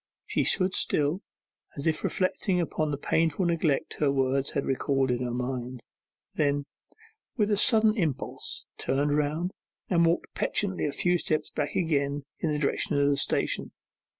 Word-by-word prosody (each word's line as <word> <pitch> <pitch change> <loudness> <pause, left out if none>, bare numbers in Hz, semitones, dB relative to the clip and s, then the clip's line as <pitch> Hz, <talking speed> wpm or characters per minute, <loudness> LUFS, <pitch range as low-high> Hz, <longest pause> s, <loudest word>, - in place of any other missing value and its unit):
She - - 0
stood 185 -1 +3
still, 150 +6 +1 0.6
as 140 - -4
if 160 -1 0
reflecting 185 0 0
upon 155 -2 -1
the 145 - -2
painful 160 +4 +1
neglect 165 -4 0
her 145 -2 +3
words 135 0 +1
had 140 - -2
recalled 135 0 0
to 125 -1 +1
her 125 -1 -2
mind; 125 0 -4 0.5
then, 145 -1 0 0.7
with 210 -2 +2
a - - +4
sudden 220 -1 +4
impulse, 155 - -1
turned 145 +2 +1
round, 150 +5 0 0.4
and 170 -2 +4
walked 170 +1 +1
petulantly 190 -6 0
a - - -2
few 175 +4 +1
steps 155 -1 -1
back 145 -1 -3
again 145 -4 0 0.2
in 160 - 0
the 150 - 0
direction 145 0 0
of 140 0 +3
the - - +2
station. - - 0
150 Hz, 160 wpm, -27 LUFS, 140-175 Hz, 0.7 s, a